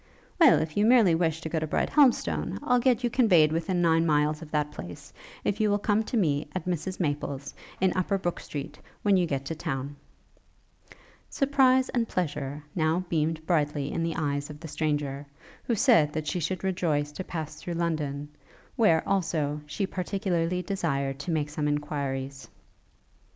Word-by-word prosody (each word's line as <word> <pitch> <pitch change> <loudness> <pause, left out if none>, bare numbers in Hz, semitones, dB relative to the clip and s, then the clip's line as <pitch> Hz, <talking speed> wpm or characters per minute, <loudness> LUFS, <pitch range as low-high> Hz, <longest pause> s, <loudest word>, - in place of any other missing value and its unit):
'Well, 320 -6 +7
if 155 -1 -2
you 205 - +3
merely 225 -6 +6
wish 160 -1 0
to 160 - -4
go 160 - 0
to 155 - -3
Brighthelmstone, 270 - +2
I'll 250 -4 +3
get 250 -1 +2
you 240 - +2
conveyed 180 - +5
within 175 +2 0
nine 165 -1 +4
miles 150 -1 +1
of 160 - -9
that 150 -1 -1
place, 85 -10 -9 0.3
if 205 - -1
you 215 - +3
will 205 - +3
come 205 +1 +1
to 240 - -2
me, 150 -7 +1
at 185 - -3
Mrs 180 +1 -3
Maple's, 145 -4 -3 0.3
in 190 -1 +2
Upper 185 +2 +1
Brooke 175 -2 -3
street, 145 -2 -7 0.2
when 205 -1 +4
you 180 -2 +2
get 140 -3 -2
to 165 - -3
town.' 145 -3 -4 1.3
Surprise 265 -2 +3
and 235 -2 0
pleasure 145 -6 -3
now 165 +2 +1
beamed 160 0 -1
brightly 150 -4 0
in 170 - -2
the 165 -1 -1
eyes 145 -2 -2
of 150 -1 -9
the 165 - -8
stranger, 145 -2 -2 0.4
who 235 - +1
said 205 - +4
that 155 -1 -3
she 180 - -1
should 175 +3 -3
rejoice 160 -6 0
to 185 - -6
pass 155 -4 -6
through 175 - -4
London, 150 -4 -2 0.5
where, 170 -8 +3
also, 155 -6 0
she 150 +7 -2
particularly 180 -2 -1
desired 140 -8 -2
to 145 - -6
make 155 -3 0
some 150 0 -1
enquiries. 140 -2 -3
160 Hz, 175 wpm, -27 LUFS, 150-190 Hz, 1.3 s, Well